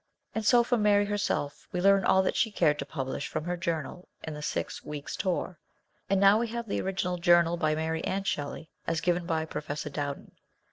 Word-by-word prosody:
And 220 - -2
so 240 +2 +5
from 240 -1 +1
Mary 205 -1 +4
herself 200 -8 -2
we 180 - -2
learn 195 +1 +5
all 190 +1 +4
that - - 0
she 225 - +2
cared 155 -7 +2
to 140 - -4
publish 135 0 -4
from - - -3
her 175 +2 -2
journal 170 0 -3 0.2
in 160 - -5
the 150 - -7
Six - - -3
Weeks' 145 -1 -6
Tour, 180 -2 -2 0.5
and 195 0 +3
now 200 +2 +6
we 235 - 0
have 235 0 -5
the - - -1
original 185 -1 -1
journal 170 0 +5
by 155 -2 +1
Mary 160 +1 -2
and 195 +1 -2
Shelley, 155 -1 -3 0.2
as 165 - +1
given 175 0 0
by 160 -2 0
Professor 150 -1 -5
Dowden. 145 -1 -4
175 Hz, 205 wpm, -29 LUFS, 155-195 Hz, 0.5 s, now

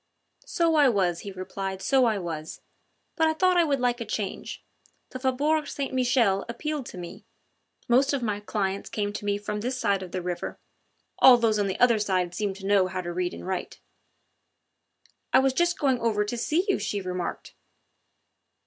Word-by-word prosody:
"So 335 -1 +1
I 295 -4 +5
was," 185 -6 +1
he 200 - -7
replied, 190 +1 -5
"so 265 +5 +3
I 220 -3 +1
was. 165 -4 -5 0.6
But 320 -1 +3
I 315 - +2
thought 370 +2 +3
I 350 - +5
would 285 -4 0
like 245 -1 0
a - - 0
change. 205 -2 -5 0.5
The 255 - -6
Faubourg 290 +4 +1
St. 275 -2 -4
Michel 245 -6 +2
appealed 300 +2 -4
to - - -9
me; 175 -1 -8 0.6
most 260 +4 +4
of 275 -3 -1
my 210 -3 -1
clients 200 -2 -3
came 205 -1 -2
to 205 - -6
me 205 0 +1
from 210 0 -4
this 250 +3 -2
side 200 -5 +1
of 185 -2 -8
the 185 -1 -4
river 175 -1 -4 0.6
all 255 -2 +9
those 225 -3 +2
on 200 - +1
the 190 - -3
other 235 -3 +5
side 185 -4 0
seem 200 0 -2
to 195 0 -10
know 195 -2 +3
how 185 0 -4
to 175 -1 -5
read 180 0 -1
and - - -9
write." 185 0 -4 1.5
"I - - +8
was 265 0 +3
just 345 +4 +1
going 265 -5 +1
over 215 -3 +1
to 210 - -3
see 310 +10 0
you," 390 - +1
she 205 - -2
remarked. 180 -2 -5
210 Hz, 195 wpm, -26 LUFS, 190-260 Hz, 1.5 s, all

